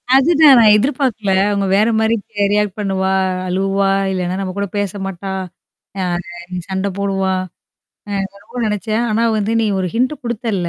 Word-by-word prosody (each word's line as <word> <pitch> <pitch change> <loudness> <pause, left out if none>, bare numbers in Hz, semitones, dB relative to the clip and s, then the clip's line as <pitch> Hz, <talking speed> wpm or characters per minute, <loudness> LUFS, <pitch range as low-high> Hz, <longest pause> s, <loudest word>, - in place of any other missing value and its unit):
அதுதான் 285 -3 +6 0.2
எதிர்பார்க்கல. 240 -5 0 0.2
அவுங்க 200 -1 0
வேறமாரி 220 +2 +2 0.4
ரியாக்ட் 210 -1 0
பண்ணுவா 190 -1 0 0.4
அழுவா! 195 +1 0 0.2
இல்லன்னா 185 -1 -2
நம்ம 185 -1 -4
கூட 200 0 -1
பேச 205 -2 -1
மாட்டா! 195 +1 -5 0.7
யா 185 - 0 0.6
சண்ட 190 +1 -1
போடுவா! 195 -1 0 0.8
அ - - -6
நான் 200 0 -4
ரொம்ப 250 - -9
நெனச்சேன். 215 +2 -1
ஆனா 220 +2 +1 0.2
வந்து 210 +2 -1
நீ 225 - +1
ஒரு 185 -1 -1
ஹிண்ட் 255 +5 +1
குடுத்தல்ல. 220 -7 -2
200 Hz, 140 wpm, -17 LUFS, 195-225 Hz, 0.8 s, அதுதான்